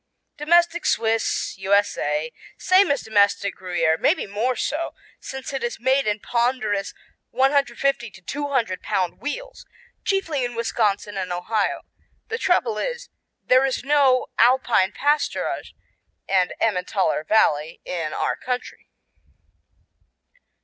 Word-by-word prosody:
Domestic 340 +3 +2
Swiss 225 0 0
U.S.A 175 -6 +1 0.3
Same 370 +1 +4
as 285 -1 0
domestic 200 -2 +2
Gruyère, 175 -3 0
maybe - - +2
more 220 +6 -1
so, 315 +6 -3 0.2
since 265 +1 -7
it 270 - -3
is 240 -1 -3
made 260 +1 +2
in 210 0 0
ponderous 235 -4 -1 0.3
150 270 -2 +1
to 195 - -16
200 265 -5 -2
pound 180 -3 -1
wheels, - - -6 0.4
chiefly 330 -9 0
in 245 -1 -3
Wisconsin 210 -3 -1
and 185 -1 -3
Ohio. 200 +4 -1 0.5
The 455 +1 -3
trouble 455 -2 +1
is - - -4 0.4
there 255 +1 +5
is 265 -2 -1
no 275 -2 +3
Alpine 240 -5 +4
pasturage 295 +5 -1 0.5
and 185 -2 +2
Emmentaler 185 -6 0
Valley 155 -5 +2
in 165 -4 -3
our - - -1
country. 250 -1 -5
235 Hz, 115 wpm, -23 LUFS, 195-275 Hz, 0.5 s, there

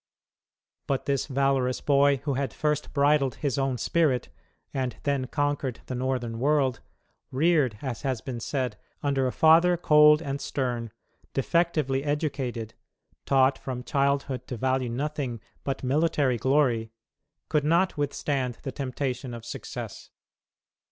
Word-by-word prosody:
But 135 -2 -1
this 140 -2 0
valorous 135 -2 +1
boy, 140 -1 +4
who 145 -1 -1
had 135 -2 -2
first 150 -1 -1
bridled 140 -2 +3
his 140 -3 -1
own 135 -2 0
spirit, 145 -4 +1 0.4
and 130 -2 -2
then 140 -3 0
conquered 145 -3 -1
the - - -5
Northern 125 -2 -2
world, 135 -2 +2 0.5
"reared," 140 -5 +2
as 130 -5 -4
has 130 -4 -1
been 120 0 -5
said, 125 -3 -2 0.3
"under 135 -2 +1
a - - -1
father 170 +4 +5
cold 150 -2 +6
and 140 -3 -4
stern, 120 -4 -2 0.4
defectively 145 -2 +1
educated, 140 -6 -2 0.5
taught 135 0 +4
from 125 -2 -5
childhood 140 -2 0
to 125 - -5
value 130 +1 0
nothing 135 -1 -3 0.2
but 135 -1 -3
military 140 -2 +2
glory," 120 -3 +2 0.6
could 150 -2 +1
not 170 +5 +2
withstand 140 -4 -1
the 135 - -3
temptation 130 -2 -3
of 115 -1 -9
success. 115 - -7
135 Hz, 130 wpm, -27 LUFS, 125-145 Hz, 0.6 s, cold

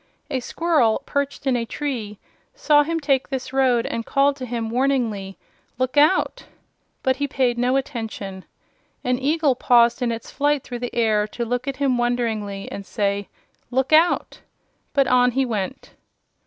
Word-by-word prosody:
A 265 - 0
squirrel, 285 -4 +1
perched 280 0 -2
in 265 -2 +2
a 235 - 0
tree, 230 -5 -4 0.4
saw 300 -11 +4
him 330 +3 -1
take 275 -3 +1
this 265 -1 -4
road 255 -3 +3
and 230 - -3
called 275 +3 +2
to 255 -2 -6
him 230 -2 -3
warningly: 235 -7 0 0.4
"Look 255 +1 -1
out!" 300 +6 +3 0.6
But 260 0 +2
he 285 +1 -1
paid 250 -3 0
no 250 +2 +2
attention. 220 -8 -5 0.6
An 250 0 0
eagle 295 +1 +2
paused 240 -1 +3
in 240 -1 +1
its 230 0 -6
flight 290 0 +1
through 245 -1 -6
the 245 0 -5
air 215 -3 +2
to 235 +2 -4
look 245 +3 -2
at 275 - -3
him 265 -3 +1
wonderingly 225 -5 -1
and 200 - -6
say: 200 -1 -2 0.4
"Look 265 +4 0
out!" 325 +3 +3 0.5
But 275 -1 +4
on 250 -1 +3
he 270 +1 +1
went. 230 +2 -4
250 Hz, 165 wpm, -22 LUFS, 230-275 Hz, 0.6 s, saw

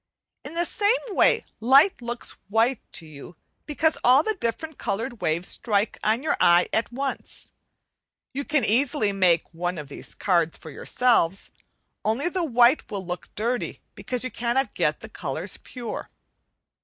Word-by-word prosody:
In 295 +4 -8
the 345 +1 +1
same 420 +6 +2
way 400 - +3
light 270 - +5
looks 240 0 -5 0.2
white 225 +4 +2
to 165 - -7
you, 155 +2 -12 0.3
because 310 +1 +1
all 260 +4 +6
the 435 - 0
different 315 - -4
coloured 230 +4 -3
waves 165 +3 -1
strike 210 -2 0
on 225 +5 +1
your 315 - +1
eye 175 +1 +5
at 225 - 0
once. 270 +2 -5 0.8
You 280 +2 -2
can 285 -5 +1
easily 245 0 +2
make 180 -4 +3
on 175 +1 -3
of 150 -2 -7
these - - -10
card 170 -4 +1
for 160 - -11
yourselves 200 - +1 0.5
only 245 +10 0
the 365 0 -2
white 245 -1 +4
will 205 - -4
always 185 - -12
look 180 - -6
dirty, 240 +4 -2
because 250 -1 -3
you 255 - -3
cannot 240 +2 -1
get - - 0
the - - -9
colours - - -4
pure. 240 -3 -7
235 Hz, 160 wpm, -25 LUFS, 195-275 Hz, 0.8 s, all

